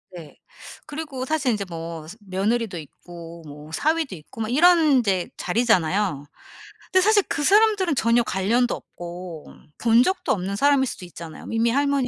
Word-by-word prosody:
네. 160 -4 -11 0.5
그리고 295 -4 -5
사실 280 -3 0
인제 205 -2 -2
뭐 165 -1 -7
스 215 +7 -11
며느리도 205 +1 -1
있고 170 +2 -11
뭐 150 +1 -11
사위도 310 - 0
있고 160 +8 -10
막 220 - -2
이런 345 +5 +6 0.2
인제 195 -7 0
자리잖아요. 190 - +1 0.7
근데 370 -1 +5
사실 415 0 +4
그 295 - -1
사람들은 400 -4 +4
전혀 235 0 +3
관련도 230 +6 +1
없고 175 -2 -9 0.3
본 230 +1 +4
적도 370 -1 -1
없는 195 0 -1
사람일 280 +3 +3
수도 185 - -7
있잖아요. 170 -2 -10
이미 225 +1 +2
할머니 280 0 +1
225 Hz, 335 characters per minute, -23 LUFS, 175-280 Hz, 0.7 s, 이런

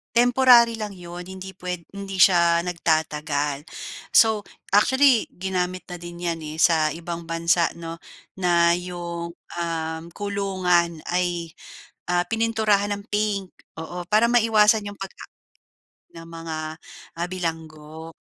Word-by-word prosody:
temporary 245 -1 +6
lang 210 -2 -4
'yon 175 0 -9
hindi 190 0 -8
puwed 180 -2 -5
hindi 195 -1 -6
siya 170 -2 +5
nagtatagal. 150 -4 -1 0.5
So, 220 -2 +5 0.3
actually 260 +3 +4
ginamit 185 0 -3
na 180 - -5
din 175 0 -9
'yan, 170 -1 -1
eh, 155 +1 -7
sa 160 -2 +4
ibang 170 0 -6
bansa 170 0 +2
'no, 165 0 -7 0.4
na 170 -2 +3
'yong, 170 -1 -6 0.3
um, 160 -1 -3
kulungan 185 -5 0
ay, 175 -2 -1 0.6
ah, 175 0 +2
pininturahan 220 -3 +1
ng 200 - -12
pink 205 -3 -1 0.3
oo 175 +2 -6
para 215 +2 +4
maiwasan 220 -2 +4
'yong 205 - -11
pagka 195 -1 -8 0.9
ng 165 - -9
mga, 165 -1 -6 0.6
ah, 175 - 0
bilanggo. 160 -2 -6
175 Hz, 120 wpm, -24 LUFS, 165-200 Hz, 0.9 s, temporary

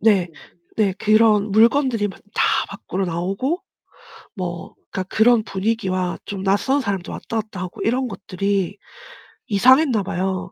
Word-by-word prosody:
네. 200 -5 +3 0.5
네. 205 -3 +2
그런 215 -1 +4
물건들이 230 +1 +3
막 190 - -11
다 - - +2 0.2
밖으로 195 -1 -4
나오고 195 - -2 0.7
뭐 175 -3 -5 0.2
그러니까 190 - -3
그런 220 +4 +3
분위기와 190 -3 -1
좀 195 -2 -5
낯선 205 +9 +2
사람들 195 -6 -3
왔다 225 - -3
갔다 205 -4 -9
하고 180 -1 -7
이런 250 +3 0
것들이 195 -1 -2 0.7
이상했나 250 +1 +4
봐요. 190 0 -3
200 Hz, 285 characters per minute, -21 LUFS, 190-225 Hz, 0.7 s, 그런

